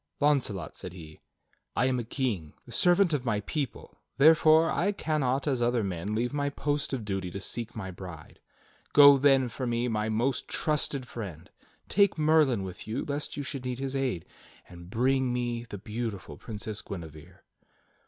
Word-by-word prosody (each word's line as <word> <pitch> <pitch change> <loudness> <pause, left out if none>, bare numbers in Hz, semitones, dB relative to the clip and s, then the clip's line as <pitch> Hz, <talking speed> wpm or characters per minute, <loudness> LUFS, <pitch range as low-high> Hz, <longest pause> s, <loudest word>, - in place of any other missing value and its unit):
"Launcelot," 130 - +1
said 90 -2 -8
he, 80 -4 -11 0.6
"I 125 - +2
am 130 -1 +1
a - - -2
king, 110 - -3
the 120 - -13
servant 175 - +4
of 140 -4 0
my 105 -4 0
people; 140 +3 -5 0.2
therefore, 160 +2 +6
I 200 +4 +1
cannot 140 -7 0
as 130 -4 +1
other 120 -1 +2
men 95 +2 -3
leave 120 +4 -1
my 145 -1 0
post 145 +1 -2
of 125 -6 -3
duty 95 -3 -3
to 100 - -6
seek 115 +3 -5
my 95 -4 -5
bride. 90 -4 -10 0.5
Go, 140 -1 +9
then, 135 -2 +4
for 125 +2 -4
me, 120 +1 0
my 110 -2 -1
most 120 +4 0
trusted 145 -4 0
friend; 95 -10 -8 0.4
take 200 -2 +3
Merlin 150 -8 +3
with 95 +2 -8
you 110 - -3
lest 145 +1 -3
you 145 - -2
should 135 -2 -5
need 125 -1 -3
his 135 +1 -3
aid, 130 -11 -1 0.4
and 85 0 -12
bring 130 +4 +1
me 120 -1 -2
the 100 - -6
beautiful 110 -1 -5
Princess 110 -1 -6
Guinevere." 80 -5 -9
120 Hz, 175 wpm, -28 LUFS, 105-140 Hz, 0.6 s, Go